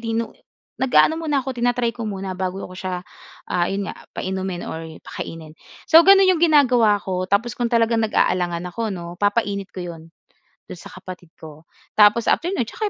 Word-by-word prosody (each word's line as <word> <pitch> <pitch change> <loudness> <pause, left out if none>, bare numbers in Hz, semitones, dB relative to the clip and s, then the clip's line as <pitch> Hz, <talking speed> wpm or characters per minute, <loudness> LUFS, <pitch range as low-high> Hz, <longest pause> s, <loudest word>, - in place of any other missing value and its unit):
di 225 0 -4
no 230 0 -2 0.5
nag-aano 290 +5 +3
muna 290 -5 -1
ako 265 - -3
tina-try 245 -1 +1
ko 230 -3 -5
muna 195 -1 -5
bago 185 +1 -4
ako 185 - -10
siya 185 -1 -5 0.5
ah, 175 -1 +1
ayun 195 +1 -2
nga - - -5 0.2
painumin 190 -1 -3
or 160 - -6 0.2
pakainin. 160 -2 -8 0.3
So 325 - +7
gano'n 390 +2 +7
'yong 370 -3 +3
ginagawa 255 -10 +4
ko 185 -1 -3
tapos 225 +5 +1
kung 240 +2 -2
talagang 230 -1 +2
nag-aalangan 180 -5 0
ako 230 -1 -3
'no, 175 -4 -6
papainit 205 -2 0
ko 180 - -4
'yon 170 -2 -8 0.7
do'n - - -8
sa - - -11
kapatid 185 -2 -11
ko. 155 0 -12 0.3
Tapos 210 +2 +5
after 345 - +2
no'n 375 -11 -1
tsaka 425 - -4
205 Hz, 180 wpm, -21 LUFS, 185-240 Hz, 0.7 s, So